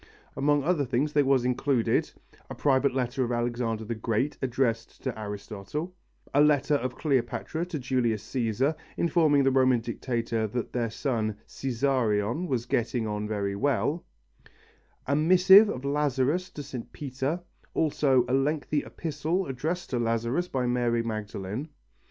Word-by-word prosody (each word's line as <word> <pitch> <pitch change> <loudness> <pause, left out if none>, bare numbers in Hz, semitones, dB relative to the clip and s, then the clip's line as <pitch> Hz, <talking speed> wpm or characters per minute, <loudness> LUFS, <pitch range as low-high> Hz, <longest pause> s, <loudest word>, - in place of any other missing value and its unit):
Among 145 +1 +2
other 165 -2 +2
things 135 +4 0
there 145 - +4
was 135 -2 +3
included: 125 -1 +1 0.4
a - - -6
private 135 -1 +2
letter 130 0 0
of 120 - -2
Alexander 120 -2 -1
the 115 - -3
Great 115 +5 -1
addressed 125 -3 -1
to 130 -3 -2
Aristotle; 105 - -5 0.4
a 145 - +5
letter 150 -1 +3
of 130 -3 0
Cleopatra 150 +4 -1
to 175 -3 -4
Julius 120 -5 0
Cæsar, 130 +4 0 0.2
informing 160 -4 +3
the 135 - +3
Roman 130 -2 +4
Dictator 115 -1 -2
that 120 +3 -4
their 120 -2 0
son 110 -3 -2
"Cesarion" 125 - 0
was 125 -5 -1
getting 120 -1 0
on 105 0 -3
very 100 -2 -2
well; 145 - 0 1.0
a 140 - +1
missive 185 +6 +7
of 130 +2 -4
Lazarus 145 +4 +1
to 145 - -7
St. 130 -4 -7
Peter; 140 +4 -3 0.3
also 140 -5 +3
a - - -1
lengthy 145 +2 +1
epistle 160 +4 -2
addressed 160 +7 -3
to 125 - 0
Lazarus 115 +8 0
by 130 -6 -1
Mary 120 -1 +1
Magdalen. 110 +4 -4
130 Hz, 145 wpm, -27 LUFS, 115-145 Hz, 1.0 s, missive